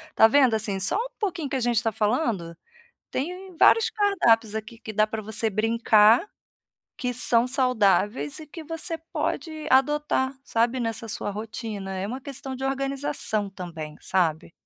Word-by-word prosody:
Tá 220 - +7
vendo, 260 0 +4
assim, 205 -3 -2
só 190 - +3
um - - -2
pouquinho 340 -9 -2
que 275 - -3
a - - -1
gente 240 0 +1
tá 225 - +1
falando, 210 - -1 0.5
tem 360 +6 -5
vários 455 - +5
cardápios 290 - +2
aqui 220 +1 -6
que 225 -1 -8
dá 215 +1 +3
para 220 0 -4
você 220 +1 -1
brincar, 225 - +4 0.7
que 250 -1 -2
são 240 0 +3
saudáveis 250 0 +1
e 310 - -10
que 325 +2 -9
você 325 +1 -3
pode 315 -1 -4
adotar, 270 0 +2
sabe, 235 +1 +1
nessa 225 -1 -3
sua 205 - -3
rotina. 210 -2 -6
É 190 - -3
uma 255 +5 -5
questão 270 0 -6
de 260 +1 -5
organização 270 -6 -1
também, 165 -5 -8
sabe? 165 -4 0
235 Hz, 160 wpm, -25 LUFS, 215-275 Hz, 0.7 s, Tá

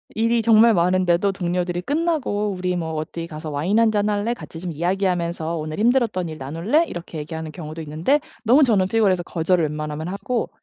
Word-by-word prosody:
일이 230 +1 +2
정말 225 0 +6
많은데도 180 +1 +2
동료들이 175 -1 -2
끝나고 285 - -1
"우리 180 -1 -2
뭐 160 -2 -3
어디 165 +2 -5
가서 155 -1 -7
와인 155 +9 0
1 230 -1 +4
잔 210 0 +1
할래? 210 +3 0
같이 165 -8 -10
좀 180 0 -5
이야기하면서 170 -1 -1
오늘 155 +3 -5
힘들었던 225 -7 +2
일 155 - -7
나눌래?" 165 - 0
이렇게 170 -2 -7
얘기하는 160 +1 -6
경우도 155 0 -7
있는데 160 - +1 0.2
너무 255 +7 +5
저는 225 -7 +3
너무 - - -14
피곤해서 195 -6 +2
거절을 170 -1 +1
웬만하면 150 +1 -4
하고 215 +6 -2
180 Hz, 440 characters per minute, -22 LUFS, 160-215 Hz, 0.2 s, 정말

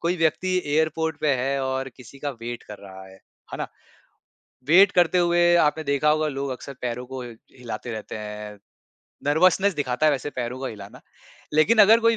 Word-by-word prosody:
कोई 175 +2 0
व्यक्ति 180 +3 +1
एयरपोर्ट 160 +2 0
पे 145 -3 +2
है 135 +2 -1
और 130 0 -2
किसी 130 +2 -14
का 145 0 -3
वेट 120 +1 -6
कर 105 -1 -11
रहा 95 -1 -11
है, 95 - -15 0.4
है - - -5
ना? - - -2 1.0
वेट 190 +4 +7
करते 180 0 +3
हुए 175 0 +4
आपने 155 +1 +1
देखा 140 +2 +1
होगा 155 0 +2
लोग 140 -1 -3
अक्सर 135 +2 -7
पैरों 125 0 -3
को 130 0 -7
हिलाते 120 0 -9
रहते 110 0 -6
हैं, 105 -1 -7 0.7
नर्वसनेस 185 +5 +3
दिखाता 140 +1 0
है 150 - +5
वैसे 140 +2 -3
पैरों 125 0 -4
का 135 - -3
हिलाना, 100 -2 -10 0.5
लेकिन 180 +10 +4
अगर 225 +3 +6
कोई 230 0 +3
140 Hz, 185 wpm, -24 LUFS, 120-165 Hz, 1.0 s, वेट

